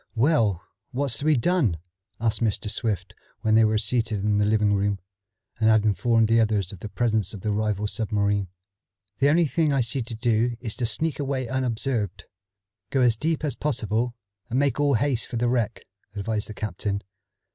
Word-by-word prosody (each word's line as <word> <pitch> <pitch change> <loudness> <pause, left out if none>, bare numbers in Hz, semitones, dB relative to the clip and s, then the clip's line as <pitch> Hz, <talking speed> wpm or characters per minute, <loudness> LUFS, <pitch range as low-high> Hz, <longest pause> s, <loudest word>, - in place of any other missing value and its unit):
"Well, 115 - +2 0.3
what's 135 -2 0
to 145 - -4
be 155 -2 +4
done?" 135 - +2 0.4
asked 115 0 0
Mr. 105 -1 0
Swift 110 -5 -2 0.3
when 110 -1 +1
they 110 +1 +6
were 110 0 +3
seated 110 -1 -1
in 105 -1 +2
the 105 - +3
living 105 -1 +3
room, 100 0 +1 0.6
and 110 0 +4
had 110 -1 +4
informed 115 +1 +3
the 115 +1 +4
others 105 -5 +1
of 100 - -10
the 105 - -7
presence 110 -2 0
of 100 - -9
the 105 - -1
rival 105 -1 0
submarine. 105 -3 0 0.7
"The 140 - +4
only 165 +3 +4
thing 155 +1 +1
I 135 -2 +2
see 120 +3 -2
to 115 0 -5
do 115 +1 +1
is 115 -4 -5
to 120 -3 0
sneak 160 +6 0
away 135 -3 -2
unobserved, 115 -6 -2 0.7
go 135 - +1
as 120 -3 +4
deep 160 +6 -1
as 145 - -1
possible, 120 -4 -1 0.3
and 120 - -1
make 140 -1 +1
all 145 -2 +3
haste 125 0 0
for 120 - -4
the 120 +1 +1
wreck," 120 -3 0 0.3
advised 105 +1 -2
the 105 - -7
captain. 100 0 -3
115 Hz, 190 wpm, -25 LUFS, 105-130 Hz, 0.7 s, they